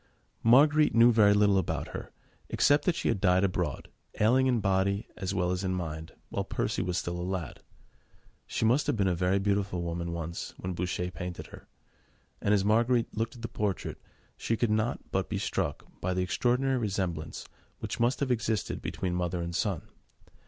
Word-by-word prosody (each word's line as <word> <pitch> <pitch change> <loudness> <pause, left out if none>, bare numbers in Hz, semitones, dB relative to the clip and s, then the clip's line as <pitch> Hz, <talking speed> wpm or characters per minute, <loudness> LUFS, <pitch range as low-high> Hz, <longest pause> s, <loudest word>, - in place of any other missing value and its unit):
Marguerite 145 +6 +5
knew 115 +1 +7
very 105 -3 +5
little 100 -1 +4
about - - -2
her, - - -7 0.4
except 145 +1 +3
that 180 - +2
she - - -2
had 95 - 0
died 95 0 +4
abroad, 90 -6 -1 0.3
ailing 130 +5 +4
in 125 -2 +2
body 95 +1 +1
as 95 0 -3
well 90 -2 +1
as 90 +1 -2
in 95 -1 0
mind, 80 -2 -5 0.2
when - - -2
Percy - - -1
was 90 -1 -1
still 85 -1 -3
a - - -3
lad. 90 -3 -4 0.9
She - - -1
must 125 +7 +3
have 145 -5 +1
been 100 -2 +2
a 90 - +2
very 90 +2 +1
beautiful 100 -2 0
woman 85 0 -3
once, 85 0 -5
when 90 0 -4
Boucher 90 0 -2
painted 90 -1 -6
her, - - -13 0.7
and 100 - +1
as 100 -2 +3
Marguerite 115 +3 +2
looked 115 +2 -2
at 120 - -12
the - - -1
portrait, 105 -4 -3 0.4
she 115 - -1
could 120 -2 +1
not 110 +2 -1
but - - -1
be - - -1
struck - - -2 0.2
by 90 0 -1
the 90 - +1
extraordinary 125 +7 +1
resemblance 95 -8 -3 0.3
which - - -5
must 120 +4 +1
have 135 -2 +1
existed 110 -2 -1
between 90 -1 -3
mother 90 0 -1
and 85 0 -4
son. 100 -3 -1
100 Hz, 190 wpm, -29 LUFS, 90-115 Hz, 0.9 s, knew